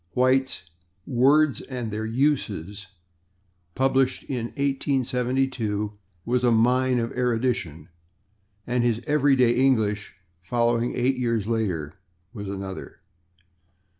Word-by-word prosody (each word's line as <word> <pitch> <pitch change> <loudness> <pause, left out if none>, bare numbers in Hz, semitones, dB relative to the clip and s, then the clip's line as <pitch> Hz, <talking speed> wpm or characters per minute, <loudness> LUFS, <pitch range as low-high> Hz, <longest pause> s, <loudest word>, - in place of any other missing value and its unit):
White's 130 -5 +1 0.4
"Words 140 +3 +3
and 120 -4 -4
Their 110 +1 -3
Uses," 110 - -1 0.9
published 135 0 +1
in 125 -4 -3
1872, 130 -5 -1 0.3
was 125 +1 0
a 120 - +4
mine 125 +3 +3
of 115 -1 -1
erudition, 115 - -1 0.8
and 120 0 0
his 115 -2 +1
"Everyday 135 -5 +3
English," 110 -7 +1 0.2
following 120 +5 0
eight 130 +2 +1
years 115 -4 0
later, 95 -10 -2 0.3
was 100 -4 -6
another. 95 -1 -7
120 Hz, 100 wpm, -25 LUFS, 110-130 Hz, 0.9 s, a